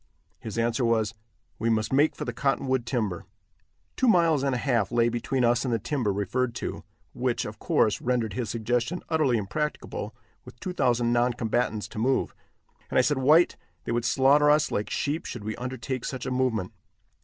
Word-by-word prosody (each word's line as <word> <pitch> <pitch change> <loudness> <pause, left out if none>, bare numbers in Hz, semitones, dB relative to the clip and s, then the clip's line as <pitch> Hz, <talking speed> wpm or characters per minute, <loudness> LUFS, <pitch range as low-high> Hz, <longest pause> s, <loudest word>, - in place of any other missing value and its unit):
His 110 0 -7
answer 115 +2 +1
was, 115 -2 +1 0.5
"We 115 - 0
must 110 +2 0
make 145 +3 +3
for - - -5
the 120 - -3
cottonwood 130 -1 0
timber." 110 -8 -2 0.7
Two 260 - +1
miles 170 - +4
and 135 -2 0
a - - 0
half 120 -6 0
lay 120 -1 +3
between 120 +2 0
us 120 +1 +2
and 130 - -1
the 115 - +2
timber 120 -1 -1
referred 120 +5 -1
to, - - -5 0.3
which, - - -1
of - - -7
course, 105 - +1
rendered 120 -4 0
his 115 +1 -3
suggestion 120 +8 -1
utterly 155 -7 +2
impracticable 150 +9 -4 0.3
with 120 - -14
two 185 - -4
thousand 120 -6 +2
noncombatants 120 -2 0
to - - -7
move, 130 +4 +1 0.6
and - - -1
I - - +7
said: 145 0 +1
"White, 155 +6 +4 0.3
they - - -4
would 120 0 0
slaughter 135 +5 +4
us 150 0 +3
like 105 - -2
sheep 150 +3 -2
should 120 - -6
we 110 +1 -3
undertake 125 0 -4
such 130 -2 -4
a 130 - -3
movement. 125 -7 0
120 Hz, 185 wpm, -26 LUFS, 115-135 Hz, 0.7 s, I